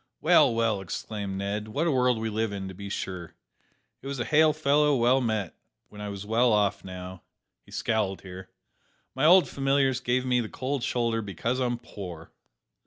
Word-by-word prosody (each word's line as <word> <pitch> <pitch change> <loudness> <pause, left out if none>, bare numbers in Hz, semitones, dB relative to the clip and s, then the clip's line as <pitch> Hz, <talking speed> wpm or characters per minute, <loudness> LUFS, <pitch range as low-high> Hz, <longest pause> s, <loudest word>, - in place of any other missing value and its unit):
"Well, - - +5
well!" 115 -3 +1
exclaimed 100 +2 -5
Ned, 100 +2 -3
"what 140 +10 -1
a 170 - +2
world 125 -2 +2
we 110 0 -2
live 110 0 -1
in, 100 -1 -5
to - - -8
be 100 +2 -8
sure! 90 -4 -5 0.7
It - - -9
was 140 0 -4
`Hail 155 +4 +3
fellow! 150 0 +3
well 125 +2 +3
met,' 110 -7 -1 0.4
when 105 - -11
I 105 - -4
was 100 0 -6
well 115 +3 +3
off; 105 -1 +1
now," 90 -1 -8 0.4
(he - - -21
scowled 105 -4 -1
here) 95 0 -10 0.6
"my 135 +3 0
old 180 +3 +7
familiars 135 -1 +1
give 125 +1 0
me 125 -1 +2
the 110 - -5
cold 135 +1 -3
shoulder 115 -2 0
because 110 +5 -2
I'm 120 -2 0
poor." 90 -8 -9
115 Hz, 180 wpm, -27 LUFS, 100-130 Hz, 0.7 s, old